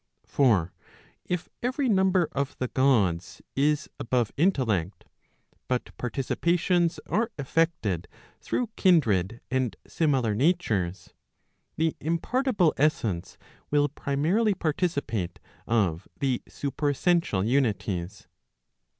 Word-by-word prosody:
For 100 - +2 0.5
if 180 -2 -2
every 260 +3 0
number 190 -5 +3
of 140 0 -3
the 125 - -2
Gods 105 -11 +1 0.2
is 150 +2 +1
above 120 -2 0
intellect, 115 - 0 0.6
but 125 -1 -2
participations 170 +7 +1
are 225 +3 0
effected 140 - 0 0.3
through 240 -3 -2
kindred 120 - +3
and 130 -3 0
similar 135 -9 +1
natures, 105 - 0 0.6
the 160 0 0
impartible 180 - +1
essence 115 - 0 0.3
will 145 0 +3
primarily 165 +11 +1
participate 145 - -1 0.3
of 100 -7 +1
the 135 -4 0
supercssential 145 - 0
unities. 105 -7 -1
140 Hz, 90 wpm, -27 LUFS, 110-170 Hz, 0.6 s, number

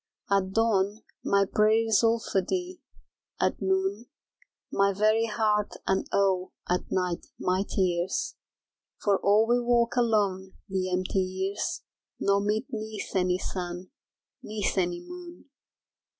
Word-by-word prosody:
At 190 -1 +2
dawn 215 -1 +1 0.2
my 200 0 +3
prayer 215 +3 +3
is 225 0 +3
all 230 0 +4
for 195 -3 0
thee, 360 - -3 0.6
at - - 0
noon 190 +4 0 0.6
My 200 0 +3
very 215 +3 +3
heart 210 -2 +1
and, 190 0 0
Oh, 190 -2 +1
at 180 +1 0
night 180 -2 -1
my 185 +1 +1
tears 180 -1 0 0.7
For 200 -2 +2
all 210 +2 +4
we 240 +1 +3
walk 240 0 +2
alone 205 -6 +1
the 190 -2 -2
empty 185 +1 0
years 190 +1 -2 0.4
Nor 200 0 +2
meet 210 +4 0
neath 215 -3 -5
any 180 -1 +2
sun 180 -1 -5 0.5
neath 210 -2 -2
any 175 -2 0
moon. 350 -5 -11
200 Hz, 130 wpm, -28 LUFS, 190-220 Hz, 0.7 s, all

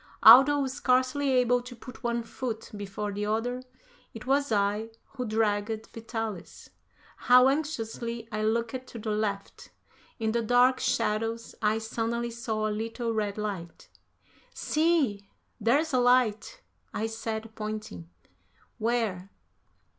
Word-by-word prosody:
Although 270 +5 +9
scarcely 260 +2 +1
able 245 -1 +3
to 245 0 -10
put 240 +1 -12
one 235 0 -1
foot 230 -1 -5
before 205 +1 -4
the 205 +1 -3
other, 240 +4 -1 0.5
it 225 - -8
was 280 0 +1
I 210 +1 +1 0.2
who 250 -3 -5
dragged 215 0 -1
Vitalis. 225 -4 -6 0.5
How 250 +1 +6
anxiously 235 -6 -3
I 215 - -2
looked 230 +4 -1
to - - -9
the 220 0 -3
left! 210 -2 -3 0.5
In 220 -2 -1
the 235 +1 0
dark 245 +3 +4
shadows 225 +2 -1
I 215 0 +2
suddenly 230 +1 -2
saw 220 -2 -2
a - - -1
little 230 +2 -3
red 210 -2 -2
light. 195 -6 -5 0.7
"See, 295 -12 +1 0.3
there's 275 +8 +2
a 255 - +4
light," 245 - +2 0.3
I 220 - -1
said, 225 0 -5
pointing. 215 - -6 0.7
"Where?" 220 -5 -1
225 Hz, 125 wpm, -28 LUFS, 215-250 Hz, 0.7 s, Although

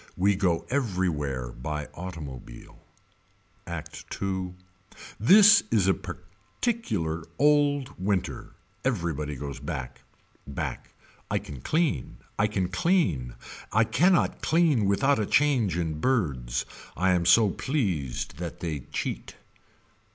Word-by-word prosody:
We 100 +2 +3
go 90 -4 +1
everywhere 85 - -1
by 75 +5 -4
automobile. 75 -9 -9 0.9
Act - - -6 0.2
II. 95 -2 -2 0.6
This 205 - +8
is 105 -5 +2
a 95 - +5
particular 95 - -4
old 145 -1 +3
winter. 95 -1 -2 0.3
Everybody 85 - -1
goes 70 +1 -6
back. 65 0 -6 0.5
Back. 70 - -5 0.3
I - - +1
can 70 -4 -7
clean. 160 - 0 0.2
I 105 - +4
can 95 -4 -1
clean. 95 - +1 0.4
I 110 - +4
cannot 170 - +2
clean 155 -9 +3
without 135 +8 +3
a 105 - +1
change 125 - +2
in 80 -3 -2
birds. 70 - 0 0.3
I 95 +3 +3
am 90 -1 +2
so 105 +2 +6
pleased 95 - -2
that 85 -3 -5
they 80 -4 -3
cheat. - - -4
95 Hz, 115 wpm, -27 LUFS, 75-125 Hz, 0.9 s, This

